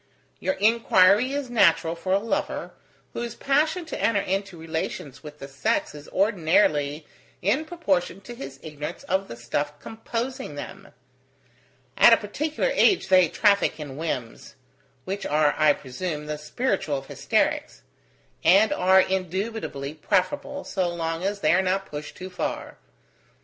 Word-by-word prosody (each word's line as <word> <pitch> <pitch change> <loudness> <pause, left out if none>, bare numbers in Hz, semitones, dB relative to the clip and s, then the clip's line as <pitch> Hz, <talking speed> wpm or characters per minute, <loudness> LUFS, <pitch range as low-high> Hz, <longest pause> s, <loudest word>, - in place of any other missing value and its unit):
Your 285 - -1
inquiry 220 0 +4
is 280 -3 -3
natural 170 -7 +4
for 185 +2 -4
a 190 - +5
lover, 220 +3 -2 0.4
whose 235 0 -4
passion 310 +5 +1
to 320 - -6
enter 225 -3 +3
into 195 -1 -2
relations 160 -4 -5
with 150 -1 -10
the 140 - -8
sex 140 +1 -1
is 150 0 -11
ordinarily 160 -6 +2 0.4
in 250 - +1
proportion 195 - -1
to 220 +5 -9
his 135 - -9
ignorance 150 -1 -6
of 190 +1 -1
the - - -8
stuff 145 +5 -3
composing 230 - -5
them. 145 - -8 1.1
At 235 - +8
a - - +6
particular 305 - -2
age 390 - +3
they 185 -2 +6
traffic 200 -5 +2
in 145 -3 -7
whims: 130 -7 -5 0.5
which 195 +2 -4
are, 150 0 +2
I 155 - +5
presume, 150 +3 -5
the 150 0 -4
spiritual 150 - -1
of 135 - -8
hysterics; - - -1 0.6
and 195 +6 +5
are 190 +1 +5
indubitably 190 -5 -3
preferable, 205 - -1
so 185 -3 -1
long 165 0 -3
as 200 +1 -2
they 155 +1 +4
are 190 - +4
not 190 +1 0
pushed 150 -2 -8
too 185 0 -8
far. 180 - -4
185 Hz, 145 wpm, -25 LUFS, 150-220 Hz, 1.1 s, At